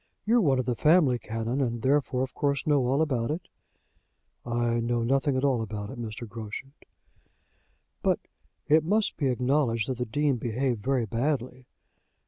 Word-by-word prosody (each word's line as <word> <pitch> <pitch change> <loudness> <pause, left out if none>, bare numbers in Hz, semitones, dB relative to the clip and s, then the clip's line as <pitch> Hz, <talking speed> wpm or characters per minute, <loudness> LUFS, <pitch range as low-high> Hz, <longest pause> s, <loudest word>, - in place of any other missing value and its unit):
You're 235 +3 +4
one 140 -8 +3
of 130 - -1
the 125 - 0
family, 150 -2 +4
Canon, 115 +4 -2
and 120 -3 -2
therefore, 135 -2 +2
of 130 - -5
course, 140 -1 -1
know 145 -4 +2
all 140 +5 +2
about 125 -6 -1
it." 160 +4 -4 1.0
"I 120 0 0
know 120 0 0
nothing 135 +2 +1
at 130 - -1
all 130 -5 +2
about 105 -2 -5
it, 120 - -7
Mr. 115 +1 -6
Groschut." 115 +4 -7 1.3
"But - - +2 0.5
it 155 +1 +5
must 205 +6 +1
be 140 - 0
acknowledged 125 -2 +1
that 130 -2 -3
the 125 - 0
Dean 145 +3 +1
behaved 120 0 -1
very 130 0 +1
badly. 125 +2 -2
130 Hz, 165 wpm, -27 LUFS, 115-140 Hz, 1.3 s, it